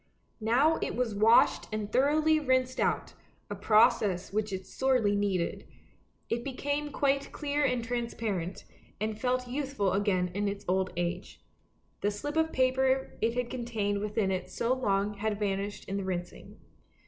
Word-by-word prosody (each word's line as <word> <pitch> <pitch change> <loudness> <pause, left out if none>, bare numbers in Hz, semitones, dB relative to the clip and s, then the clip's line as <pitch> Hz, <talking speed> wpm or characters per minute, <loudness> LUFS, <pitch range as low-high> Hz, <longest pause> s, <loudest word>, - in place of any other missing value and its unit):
" - - -41
Now 265 +9 +3
it - - -2
was 240 -2 -1
washed 220 +3 +4
and 215 -1 -3
thoroughly 310 +4 +3
rinsed 255 -3 +1
out, - - 0 0.4
a - - -2
process 205 -3 +3
which 215 0 -1
it 190 -1 -4
sorely 250 -6 +1
needed; 195 -4 -1 0.6
it 235 +1 -2
became 285 +2 -2
quite 275 0 0
clear 290 -1 -1
and 250 -4 +1
transparent, 230 -6 -3 0.4
and 215 +1 -3
felt 250 0 0
youthful 260 -7 -1
again 190 -3 +1
in 205 +2 -1
its 200 0 -4
old 185 +1 +1
age. 175 +1 -4 0.6
The 205 - +2
slip 290 +9 -5
of 320 0 +2
paper 260 +1 +1
it 230 +1 +1
had 245 -1 -2
contained 225 -5 -2
within 210 -1 0
it 185 -1 -3
so 235 +2 0
long 205 -5 0
had 210 +1 -2
vanished 200 0 -2
in 195 - -2
the 200 - -2
rinsing. 180 -2 -5
220 Hz, 160 wpm, -30 LUFS, 200-260 Hz, 0.6 s, washed